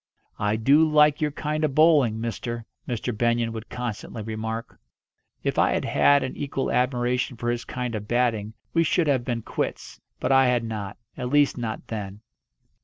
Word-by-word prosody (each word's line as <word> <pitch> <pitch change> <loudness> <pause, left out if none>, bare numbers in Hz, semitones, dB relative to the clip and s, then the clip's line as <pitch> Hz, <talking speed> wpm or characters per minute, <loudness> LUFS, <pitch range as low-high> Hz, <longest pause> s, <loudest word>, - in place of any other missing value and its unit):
"I 105 +1 +1
do 140 +8 +5
like 150 -1 +4
your 150 - +2
kind 150 +1 -3
of 145 -3 0
bowling, 150 -9 +5
mister," 115 +1 -4 0.2
Mr. 120 -1 -2
Benyon 120 0 +1
would 115 +1 -7
constantly 115 -2 -5
remark. 110 +1 -5 0.6
If - - 0
I - - +4
had - - -1
had 145 -1 +4
an 130 - -4
equal 135 -1 -2
admiration 125 0 0
for 120 +1 -1
his 120 0 -3
kind 125 -2 -4
of 105 -1 -5
batting 115 -3 0 0.2
we 165 - +4
should 165 +1 +2
have 135 -5 +2
been 120 -3 -3
quits, - - -4 0.2
but - - 0
I 135 -1 +6
had 125 -1 +2
not; 105 -3 -5 0.2
at 125 -1 -3
least 145 +1 +3
not 115 -3 -4
then. 105 -2 -6
120 Hz, 180 wpm, -25 LUFS, 110-140 Hz, 0.6 s, I